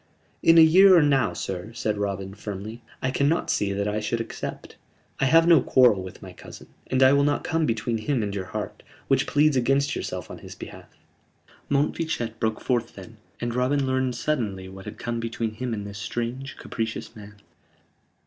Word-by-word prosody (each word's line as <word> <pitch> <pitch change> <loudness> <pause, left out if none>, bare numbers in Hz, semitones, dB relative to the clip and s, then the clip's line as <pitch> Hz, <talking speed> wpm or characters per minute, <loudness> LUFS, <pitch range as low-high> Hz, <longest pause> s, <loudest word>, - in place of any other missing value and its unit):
"In 165 0 +6
a - - +10
year 185 +4 +7
or 165 - +5
now, 135 -5 +2
sir," 95 +3 -5
said 110 -3 -1
Robin, 100 -1 -3
firmly, 105 +3 -7 0.2
"I 130 - +1
cannot 145 +5 +1
see 100 -1 0
that 100 +1 -1
I 105 +1 -1
should 110 +2 -2
accept. 115 - -6 0.4
I 135 - +2
have 165 +4 +5
no 165 -5 +7
quarrel 120 -8 +4
with 95 -1 -10
my - - -10
cousin, - - -12 0.2
and 130 0 +2
I 130 +1 +7
will 140 0 +4
not 145 0 +1
come 165 -2 0
between 115 0 -1
him 120 +1 -1
and 100 -1 -3
your 95 -2 -4
heart 90 - -6 0.3
which - - +2
pleads 150 0 +3
against 135 +3 +1
yourself - - -5
on - - -9
his - - -11
behalf." - - -11 0.8
Montfichet 140 -5 -1
broke 110 -1 -1
forth 120 -3 -1
then, 100 +3 -12 0.2
and 120 0 -3
Robin 130 +3 +1
learned 130 -1 0
suddenly 110 -9 -2
what 95 0 -11
had - - -8
come 120 0 -3
between 115 -1 -3
him 125 +3 -4
and 105 -3 -4
this 100 0 -8
strange, 120 +5 -4
capricious 115 -2 -5
man. 105 -1 -12
120 Hz, 190 wpm, -25 LUFS, 105-140 Hz, 0.8 s, a